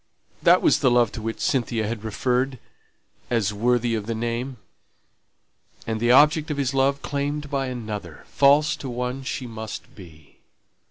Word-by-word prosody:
that - - +5
was - - +4
the 130 - +3
love 120 -2 +3
to 110 - -7
which 115 +1 -4
Cynthia 115 -4 0
had 110 -1 -4
referred, 125 +4 -1 0.7
as 110 -4 0
worthy 120 +2 +1
of 110 -2 -3
the 115 - -2
name!) 120 +3 -3 1.3
and 110 -1 -2
the 120 +1 +1
object 150 +4 +5
of 150 - -2
his 135 -2 -1
love 135 +1 +1
claimed 145 +1 -3
by 135 -1 -1
another 105 - -6
false 145 +2 +4
to 135 - -6
one 125 +2 -3
she 130 -1 -4
must 110 -2 -8
be! 80 -6 -16
125 Hz, 160 wpm, -24 LUFS, 110-135 Hz, 1.3 s, that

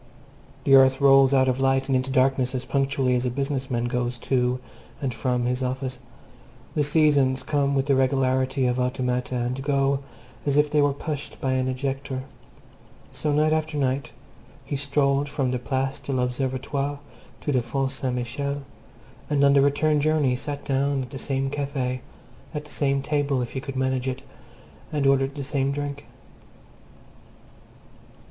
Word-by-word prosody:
The 135 - +3
earth 130 0 +7
rolls 135 -1 +6
out 130 -1 +4
of 130 0 +1
light 135 0 +2
and 135 - +1
into 130 +1 0
darkness 130 -1 +2
as 125 - -3
punctually 135 -2 +1
as 125 0 +1
a - - +1
business 135 +1 -2
man 120 -2 0
goes 120 0 -1
to 125 -1 +2 0.4
and 135 -3 -2
from 125 +1 -1
his 125 +1 -1
office; 130 0 -3 0.7
the 150 - +1
seasons 145 -3 +3
come 140 -1 +1
with 135 -1 +1
the 140 - +2
regularity 130 0 +2
of 125 0 +1
automata, 125 0 -1
and 125 +2 -2
go 140 -1 +1 0.4
as 145 -1 +1
if 150 0 +3
they 150 -1 +4
were 145 0 +3
pushed 145 +1 -5
by 130 - -1
an 130 0 +1
ejector; 135 0 -3 0.9
so, 150 - -2
night 155 +1 +3
after 155 -1 -1
night, 135 -1 -1 0.5
he - - -3
strolled 140 0 +1
from 140 -3 -1
the 125 - -1
Place 135 +2 -2
de 140 0 -6
l'Observatoire 130 +2 -1 0.4
to 145 - -1
the 130 -3 +2
Font 135 +3 -1
St. 135 -2 -2
Michel, 140 +4 -3 0.7
and, 145 -2 +2
on 140 - +5
the 140 - +5
return 145 +2 +2
journey, 150 -4 +2
sat 145 +2 -5
down 140 0 +1
at 125 - -10
the 135 - -6
same 135 0 -2
Café, 140 -3 -2 0.6
at 150 0 -4
the 150 - -10
same 140 -1 0
table, 145 -3 0
if 120 - -6
he 130 - -4
could 135 0 -6
manage 130 0 0
it, 130 +1 -3 0.7
and 145 -2 0
ordered 135 0 +3
the 140 - -4
same 135 0 0
drink. 145 0 -4
135 Hz, 170 wpm, -25 LUFS, 130-140 Hz, 0.9 s, earth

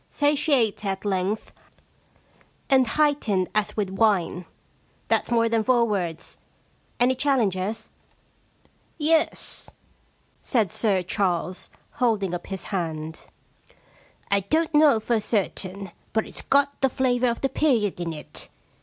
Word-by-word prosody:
Satiate 290 -7 +1
at 195 0 -3
length, 195 +1 -1 1.2
and 260 -2 +5
heightened 235 -9 +1
as 215 0 -1
with 200 -3 -1
wine." 195 -4 +1 0.6
That's - - +1
more 230 -1 +3
than 225 -1 +1
four 240 0 +3
words. 175 -7 -3 0.6
Any 250 +1 +4
challengers? 225 -7 -1 0.3
' - - -39
* - - -39 0.2
Yes,* 315 +1 0 0.7
said 220 - +1
Sir 195 -5 +1
Charles, 180 -1 -1 0.3
holding 210 -7 +1
up 175 - -5
his 190 -2 -5
hand. 160 -3 -4 0.6
* - - -27
I 200 - +4
don't 315 - 0
know 295 -6 +5
for 225 +1 0
certain, 195 -3 -2 0.2
but 220 - +1
it's - - -8
got 280 0 +1
the 270 - +4
flavour 250 -1 +1
of 235 - -3
the 270 - +1
period 235 - +1
in 170 -1 -3
it. 155 - -10
215 Hz, 130 wpm, -24 LUFS, 190-260 Hz, 1.2 s, and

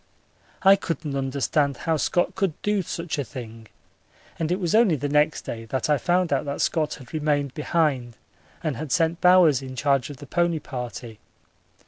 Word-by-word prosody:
I 195 +1 +8
couldn't 165 -5 -4
understand 140 +1 0
how 165 - 0
Scott 175 +5 +1
could 190 -5 -1
do 210 -1 +1
such 165 -3 -4
a - - 0
thing, 115 -3 -9 0.7
and 165 0 -1
it 180 - 0
was 175 -4 -1
only 215 -6 +5
the 145 0 -3
next 150 +2 +2
day 115 -1 -6
that 130 +5 -1
I 145 - +3
found 180 -3 +1
out 135 - +1
that 140 0 -4
Scott 155 -3 0
had 130 +1 -14
remained 145 -3 0
behind 145 -7 0 0.5
and 155 -7 -2
had 155 -2 -6
sent 165 +2 +1
Bowers 180 -7 +6
in 130 -1 -8
charge 140 -1 +1
of 145 - -8
this 145 - -11
pony 170 +2 +1
party. 120 -5 -7
150 Hz, 180 wpm, -24 LUFS, 135-170 Hz, 0.7 s, I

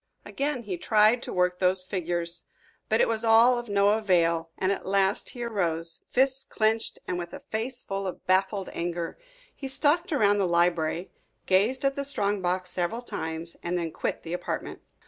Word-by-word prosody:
Again 280 -3 -2
he 190 -4 -4
tried 215 +5 +4
to - - -6
work 180 0 +1
the 185 0 +3
figures. 175 -2 -1 0.4
But 220 - +3
it - - +4
was 225 0 0
all 230 +2 +6
of 240 -2 -8
no 200 0 +4
avail, 170 -6 +2
and 190 0 +1
at 200 - -2
last 195 +2 +1
he 240 - -6
arose, 170 -7 -1
fists 265 +1 +2
clenched, 220 0 0
and 180 - -2
with 175 0 -6
a - - -10
face 240 +3 -3
full 195 0 -3
of 185 - -7
baffled 190 +1 +1
anger. 170 - -3 0.4
He 275 - -6
stalked 295 +6 +1
around 205 -8 +3
the 190 - +2
library, 170 0 +1 0.3
gazed 215 +9 +2
at 275 0 +2
the 280 - -2
strong 205 -7 0
box 180 0 -1
several 180 +7 -2
times, 160 -5 -5
and 175 +1 -2
then 165 -2 -2
quit - - -3
the 165 - -5
apartment. 180 - -4
195 Hz, 185 wpm, -27 LUFS, 175-230 Hz, 0.4 s, all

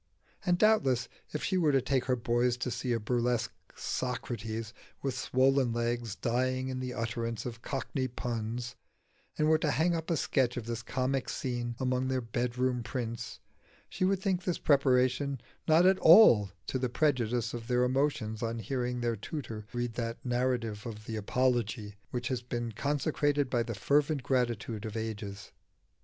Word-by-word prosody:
And 175 -1 +2
doubtless 175 - +3 0.2
if 150 - -3
she 190 -1 +1
were 155 -4 +4
to 135 - +4
take 130 0 0
her 130 - +2
boys 120 +1 +1
to 125 0 -2
see 120 +2 -2
a 115 - +1
burlesque 120 +1 0 0.2
Socrates, 115 -3 -3 0.3
with 135 -2 -1
swollen 130 -1 +2
legs, 120 -2 -1
dying 130 +2 0
in 130 -1 -3
the 130 0 -3
utterance 115 0 -3
of 120 -1 -6
cockney 135 0 -2
puns, 120 0 -4 0.6
and 155 - +2
were 155 0 +4
to 155 - +1
hang 165 +4 +2
up 165 0 -3
a 165 - +2
sketch 125 -4 +1
of 120 - -4
this 115 0 -3
comic 130 +2 -1
scene 120 -2 -3
among 130 0 0
their 130 0 0
bedroom 125 +1 -1
prints, 115 -1 -4 0.5
she - - -3
would 190 0 +3
think 190 -2 0
this 180 -2 -1
preparation 135 -1 +2 0.3
not 160 +2 +6
at 190 0 +5
all 140 - +8 0.2
to 130 - -2
the 125 -1 0
prejudice 125 -5 +1
of 115 -1 -6
their 125 -1 +2
emotions 125 -4 0
on 115 0 -2
hearing 125 0 -2
their 120 -1 0
tutor 110 -2 -6
read 120 -1 -2
that 115 0 -3
narrative 120 -4 0
of 110 -2 -8
the 110 - -4
Apology 110 -1 0 0.2
which 120 -1 -3
has 130 -2 -1
been 120 -1 -3
consecrated 145 +2 0
by 120 - +2
the 115 -2 -4
reverent 145 -1 +3
gratitude 120 -4 -1
of 110 -1 -4
ages. 105 -2 -5
125 Hz, 170 wpm, -31 LUFS, 115-135 Hz, 0.6 s, all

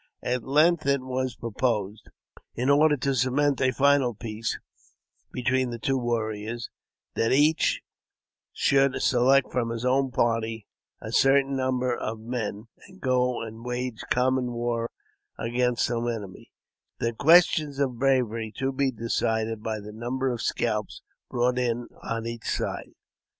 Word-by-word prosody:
At 125 0 -1
length 155 +4 +3
it 140 -1 +2
was 130 -1 -3
proposed, 110 -3 -2 0.5
in 125 +4 +1
order 150 +1 +5
to 135 +2 0
cement 135 +2 +1
a 130 - +4
final 135 -2 +3
peace 110 0 -4 0.7
between 130 0 0
the 120 - -5
two 135 +4 0
warriors, 115 -2 -2 0.4
that 115 - +1
each 150 +4 +3 0.7
should 135 -1 +2
select 130 +2 +3
from 120 -2 0
his 115 +1 -4
own 135 +1 +2
party 115 -3 0 0.4
a 110 - -6
certain 135 +2 +3
number 130 -1 0
of 110 0 -4
men, 110 -2 -4 0.2
and 190 -1 -16
go 125 -4 +1
and 110 +1 -9
wage 125 -1 -3
common 125 0 +1
war 120 0 -2 0.5
against 120 +1 0
some 120 0 -1
enemy 105 -5 -6 0.2
— - - -61
the 115 0 -1
question 155 +2 +5
of 130 -4 -1
bravery 120 -5 +1
to 135 +1 0
be 135 0 +1
decided 115 -2 -1
by 110 -1 -3
the 105 +1 -9
number 125 +4 -2
of 120 -2 -4
scalps 110 -3 -2 0.3
brought 125 0 +1
in 120 -1 -1
on 115 0 -3
each 115 0 -5
side. - - -3
125 Hz, 145 wpm, -26 LUFS, 115-130 Hz, 0.7 s, order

